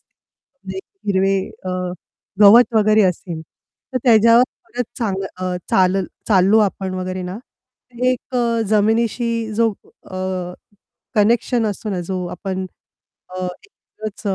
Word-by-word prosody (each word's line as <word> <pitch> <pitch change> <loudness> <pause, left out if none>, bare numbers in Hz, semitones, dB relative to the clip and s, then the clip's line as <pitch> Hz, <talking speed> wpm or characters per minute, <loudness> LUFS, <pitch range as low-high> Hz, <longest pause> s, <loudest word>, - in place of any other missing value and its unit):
म्हणजे 195 -9 -13 0.3
हिरवे 195 0 +2 0.3
अ, 185 - -3 0.7
गवत 230 +4 +7
वगैरे 215 0 +4
असेल, 175 -2 -2
तर 255 +9 -9
त्याच्यावर 230 0 +6 0.3
परत 245 0 -3
चाल 215 -5 -1 0.2
अ, 185 0 -3 0.2
चालल 185 0 +3 0.2
चाललो 195 +1 +5
आपण 190 -2 -1
वगैरे 185 0 -4
ना, 180 +3 -5
तर 250 0 -11
एक 255 0 -1
अ, 235 -1 +1
जमिनीशी 225 +3 +2 0.2
जो 225 0 +2 0.4
अ, 185 -1 -4 0.6
कनेक्शन 230 +2 +2
असतो 210 +1 -3
ना 185 -3 -2
जो 185 -1 -2
आपण 190 -1 -4 0.7
अ, 185 - -2 0.2
एकच 215 - -10
210 Hz, 120 wpm, -20 LUFS, 185-230 Hz, 0.7 s, गवत